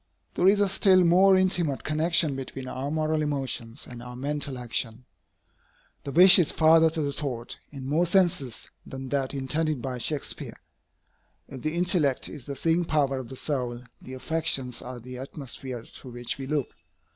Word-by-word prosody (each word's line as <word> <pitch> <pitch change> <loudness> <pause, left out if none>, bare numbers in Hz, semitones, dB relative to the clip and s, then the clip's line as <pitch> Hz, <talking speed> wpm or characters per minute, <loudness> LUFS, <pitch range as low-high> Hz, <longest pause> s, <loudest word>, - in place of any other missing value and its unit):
There 180 - +2
is 200 +1 +5
a 205 - +3
still 190 -1 +4
more 190 +3 +5
intimate 180 -7 0
connection 155 -1 +2
between 135 0 -7
our 130 +2 -4
moral 155 0 0
emotions 135 -4 -3
and 120 -1 -10
our 125 0 -9
mental 140 +1 -3
action. 120 0 -4 1.0
The 140 - -4
wish 185 +5 +9
is 170 - +3
father 160 0 +5
to 160 0 -3
the 140 -1 -2
thought, 125 -5 -5
in 135 -3 -8
more 155 +6 +1
senses 170 - 0
than 130 0 -8
that 140 0 -2
intended 150 +2 -1
by 125 0 -5
Shakspeare. 145 +4 -2 0.9
If 130 -2 -9
the 155 +1 -2
intellect 170 -6 +1
is 140 -5 -11
the 140 - -5
seeing 165 +5 +1
power 140 -5 0
of 125 - -8
the 135 - -8
soul, 125 -4 -3 0.2
the 130 - -9
affections 135 -4 -1
are 125 0 -8
the 125 +1 -9
atmosphere 130 -3 -6
through 125 - -12
which 120 +2 -5
we 135 - -6
look. 145 -2 -1
140 Hz, 170 wpm, -26 LUFS, 130-160 Hz, 1.0 s, wish